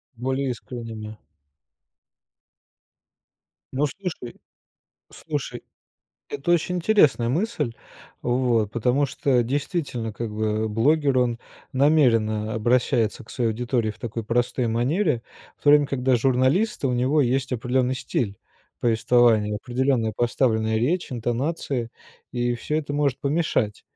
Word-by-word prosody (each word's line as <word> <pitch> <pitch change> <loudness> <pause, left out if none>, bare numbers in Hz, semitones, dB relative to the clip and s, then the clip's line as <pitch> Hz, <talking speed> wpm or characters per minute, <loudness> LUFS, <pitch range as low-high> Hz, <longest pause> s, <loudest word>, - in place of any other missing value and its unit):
Более 130 +2 -1
искренним, 115 -2 -6
да. 105 0 -8 2.6
Ну, 145 +3 +1
слушай. 160 -6 -6 0.7
Слушай, - - -5 0.7
это 145 +4 -3
очень 180 +2 +1
интересная 165 - +3
мысль, 155 - -1 0.5
вот. 120 -4 +1
Потому 125 +5 +1
что 130 -2 +1
действительно, 135 - -2
как 115 +1 -5
бы, 110 +1 -1
блогер, 135 +4 +2
он 120 -2 +1 0.3
намеренно 115 -7 +2
обращается 115 -1 +1
к - - -15
своей 120 -3 0
аудитории 120 -1 -1
в 105 - -12
такой 115 -1 -5
простой 120 +1 0
манере. 125 - +1 0.4
В - - -35
то 145 - +5
время 145 -1 +6
когда 130 -2 +1
журналист, 130 - +1
у 130 - +2
него 130 +5 +2
есть 130 +1 0
определенный 125 +2 0
стиль 105 -5 -3 0.4
повествования, 115 -2 +3
определенная 125 -1 0
поставленная 110 -2 +1
речь, 145 +6 0
интонации, 120 +1 -2 0.4
и 120 -1 0
всё 150 +6 -3
это 145 -2 -3
может 145 -3 0
помешать. 140 -8 0
125 Hz, 120 wpm, -24 LUFS, 115-140 Hz, 2.6 s, время